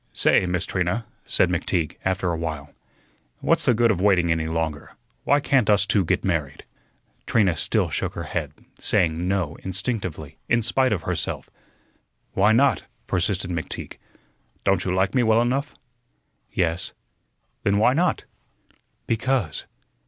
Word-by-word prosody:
"Say, 90 - +3
Miss 90 +1 0
Trina," 95 +5 -1 0.2
said 90 - +2
McTeague, 85 -2 -1
after 95 -1 0
a - - -1
while, 80 -3 -5 0.7
"what's - - +1
the 125 - +4
good 115 0 +4
of 90 -4 -1
waiting 90 -4 +3
any 80 -1 0
longer? 80 -2 -3 0.3
Why 145 - +4
can't 135 -5 +2
us 100 -1 +4
two 100 -1 +2
get 85 - 0
married?" 80 -7 -2 0.6
Trina 100 -7 +3
still - - +2
shook - - -2
her - - -4
head, - - -3 0.3
saying 85 +1 +1
"No" 90 -5 -1
instinctively, 95 - -4
in 120 -1 +3
spite 130 +3 +2
of 105 - -1
herself. - - -3 0.8
"Why 100 +3 +4
not?" 125 - +3 0.2
persisted 90 0 -1
McTeague. 85 -2 -4 0.7
"Don't 95 -1 +2
you 90 - 0
like 95 +1 +1
me 130 - +3
well 110 -1 +4
enough?" 130 +4 0 0.8
"Yes." 85 +1 -1 0.7
"Then 100 0 +2
why 115 +4 +4
not?" 175 +4 +1 0.8
"Because." 115 - -1
95 Hz, 145 wpm, -24 LUFS, 85-115 Hz, 0.8 s, the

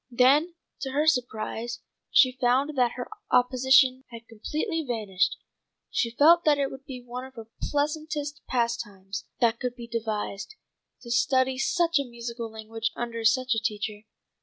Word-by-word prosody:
Then 275 +8 +4 0.2
to 265 -1 -4
her 295 +2 +2
surprise 240 -4 -1 0.3
she 255 - +6
found 265 +5 +2
that 245 -2 +2
her 250 - -5 0.2
opposition 260 +1 +4
had 230 -1 -11
completely 310 - -3
vanished. 215 -8 0 0.5
She 235 - +1
felt 320 +8 +5
that 300 -2 +4
it 275 -1 0
would 270 0 -10
be 255 -2 -8
one 245 +1 -6
of 260 0 -12
the 225 -2 -8 0.2
pleasantest 295 0 -2
pastimes 230 -5 -2 0.2
that 230 -1 +3
could 250 -1 -3
be 240 -1 -8
devised, 220 - -4 0.5
to 235 - -7
study 260 +2 +2
such 335 0 +2
a - - 0
musical 235 -2 -6
language 220 +1 -4
under 230 -1 -4
such 255 +2 +3
a 225 - +1
teacher. 210 -1 -3
245 Hz, 155 wpm, -27 LUFS, 230-275 Hz, 0.5 s, she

